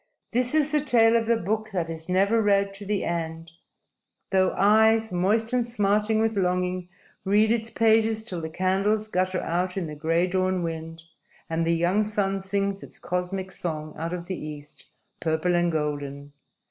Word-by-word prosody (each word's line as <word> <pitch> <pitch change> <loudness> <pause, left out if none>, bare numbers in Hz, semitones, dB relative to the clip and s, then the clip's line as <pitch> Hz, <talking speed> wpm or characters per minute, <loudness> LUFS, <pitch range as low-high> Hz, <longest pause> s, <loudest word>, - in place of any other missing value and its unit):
_ 240 - +3
_This 250 +3 0
is 305 -1 +2
the 300 -1 +2
tale 230 -5 +4
of 230 -1 +1
the 235 0 +3
book 215 +2 -2
that 175 -3 -1
is 160 +1 -7
never 200 +5 +3
read 200 -1 +2
to 195 0 -10
the 205 -1 0
end, 165 -1 -4 0.8
though 190 -1 +3
eyes, 220 +2 +4
moist 210 +6 +1
and 245 -2 +1
smarting 210 -1 +1
with 225 0 +1
longing, 180 -1 -1 0.3
read 210 +3 +3
its 230 -1 0
pages 220 -1 +2
till 180 -6 -4
the 160 - -4
candles 195 +5 0
gutter 185 -1 0
out 180 +3 -2
in 185 - -1
the 155 - -6
gray 165 +3 +1
dawn 185 0 0
wind 165 0 -5 0.5
and 165 0 0
the 170 - +3
young 175 +5 +2
sun 200 -2 -1
sings 195 +1 -1
its - - -11
cosmic 185 +1 -3
song 155 -4 -5
out 165 +2 -4
of 175 -1 -5
the 185 -2 -5
East, 150 -1 -10 0.3
purple 160 +2 0
and 175 0 +2
golden. 145 -2 -4
190 Hz, 180 wpm, -25 LUFS, 170-215 Hz, 0.8 s, tale